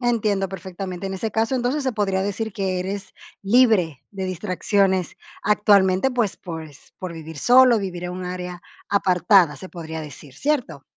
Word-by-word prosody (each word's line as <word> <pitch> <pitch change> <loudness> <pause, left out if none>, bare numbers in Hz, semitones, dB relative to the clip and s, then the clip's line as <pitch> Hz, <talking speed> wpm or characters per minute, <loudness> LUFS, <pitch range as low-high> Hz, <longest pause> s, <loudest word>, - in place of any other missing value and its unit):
Entiendo 215 -5 +1
perfectamente. 185 0 -6
En 190 - -4
ese 220 +4 -3
caso, 225 +4 0
entonces 255 +4 0
se 260 -1 -1
podría 195 -3 0
decir 205 +2 -3
que 190 -2 -1
eres 195 +2 -5 0.3
libre 200 - +3
de 195 -2 -5
distracciones 185 0 0 0.3
actualmente, 205 +1 +4
pues, 240 -6 0
por 165 -2 -7
es 145 -3 -17
por 185 -2 -5
vivir 160 -2 -9
solo, 250 - +6
vivir 180 -3 -5
en 180 - -3
un 185 0 -5
área 180 0 -6 0.3
apartada, 180 -4 +4
se 185 - -10
podría 160 -2 -7
decir, 150 -2 -11
¿cierto? 250 - -1
190 Hz, 165 wpm, -23 LUFS, 180-215 Hz, 0.3 s, solo